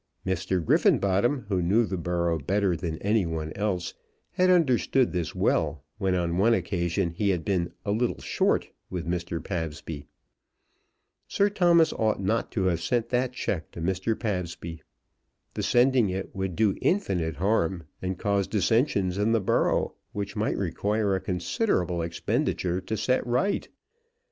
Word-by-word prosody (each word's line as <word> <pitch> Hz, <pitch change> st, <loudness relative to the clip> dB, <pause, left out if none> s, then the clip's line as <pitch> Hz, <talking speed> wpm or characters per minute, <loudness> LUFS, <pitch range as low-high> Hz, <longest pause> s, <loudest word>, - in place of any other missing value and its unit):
Mr. 95 Hz, -1 st, -1 dB
Griffenbottom, 100 Hz, -, +3 dB
who 95 Hz, -3 st, 0 dB
knew 105 Hz, +7 st, +3 dB
the 95 Hz, -, -3 dB
borough 85 Hz, -1 st, 0 dB
better 95 Hz, +4 st, +1 dB
than 80 Hz, -1 st, -4 dB
any 105 Hz, +1 st, +3 dB
one 80 Hz, -2 st, -4 dB
else, 95 Hz, -4 st, -2 dB, 0.4 s
had 185 Hz, 0 st, +2 dB
understood 135 Hz, -6 st, +3 dB
this 90 Hz, -3 st, -2 dB
well 75 Hz, -3 st, +1 dB, 0.2 s
when 95 Hz, -2 st, +1 dB
on 85 Hz, 0 st, 0 dB
one 115 Hz, +4 st, +5 dB
occasion 85 Hz, -2 st, -1 dB
he 100 Hz, +4 st, 0 dB
had 90 Hz, -5 st, 0 dB
been 90 Hz, -3 st, 0 dB
"a 100 Hz, -, 0 dB
little 120 Hz, +4 st, 0 dB
short" -, -, 0 dB, 0.2 s
with 90 Hz, -2 st, -4 dB
Mr. 85 Hz, -1 st, -2 dB
Pabsby. 80 Hz, -4 st, -5 dB, 1.2 s
Sir 200 Hz, +1 st, +2 dB
Thomas 170 Hz, -5 st, +4 dB
ought 110 Hz, -2 st, 0 dB
not 105 Hz, +4 st, 0 dB
to 100 Hz, -, 0 dB
have 85 Hz, -3 st, +1 dB
sent 120 Hz, +4 st, 0 dB
that 125 Hz, 0 st, 0 dB
cheque 85 Hz, -9 st, -3 dB
to -, -, -8 dB
Mr. 95 Hz, +6 st, -1 dB
Pabsby. 85 Hz, -5 st, -4 dB, 0.7 s
The -, -, -3 dB
sending 125 Hz, -3 st, +3 dB
it 95 Hz, +1 st, -4 dB
would 95 Hz, -2 st, -2 dB
do 105 Hz, -1 st, +2 dB
infinite 90 Hz, -, 0 dB
harm, 95 Hz, -1 st, 0 dB, 0.2 s
and 95 Hz, 0 st, -3 dB
cause 100 Hz, 0 st, 0 dB
dissensions 100 Hz, -, +1 dB
in 110 Hz, +2 st, +2 dB
the 115 Hz, -, +3 dB
borough, 95 Hz, -, +1 dB, 0.2 s
which 100 Hz, -1 st, -4 dB
might -, -, 0 dB
require 105 Hz, -1 st, 0 dB
a 95 Hz, -, -2 dB
considerable 90 Hz, -, 0 dB
expenditure 85 Hz, +2 st, -1 dB
to 110 Hz, -, -3 dB
set 115 Hz, +5 st, +1 dB
right. 150 Hz, +12 st, 0 dB
95 Hz, 155 wpm, -27 LUFS, 85-110 Hz, 1.2 s, one